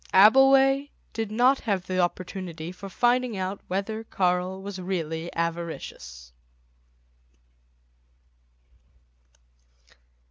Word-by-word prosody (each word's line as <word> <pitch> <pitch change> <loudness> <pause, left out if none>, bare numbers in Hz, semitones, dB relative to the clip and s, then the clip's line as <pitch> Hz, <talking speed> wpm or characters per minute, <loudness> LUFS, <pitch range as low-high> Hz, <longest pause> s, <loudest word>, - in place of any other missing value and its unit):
Abbleway 270 +6 +6 0.2
did 225 -2 -3
not 250 +5 +4
have 195 -5 -2
the 185 0 -2
opportunity 175 -2 -3
for 185 +2 -9
finding 245 +2 +1
out 190 +1 -3
whether 200 +4 -3
Karl 185 -2 0
was 195 -1 -7
really 170 -2 -3
avaricious. 165 - -5
190 Hz, 80 wpm, -26 LUFS, 175-225 Hz, 0.2 s, Abbleway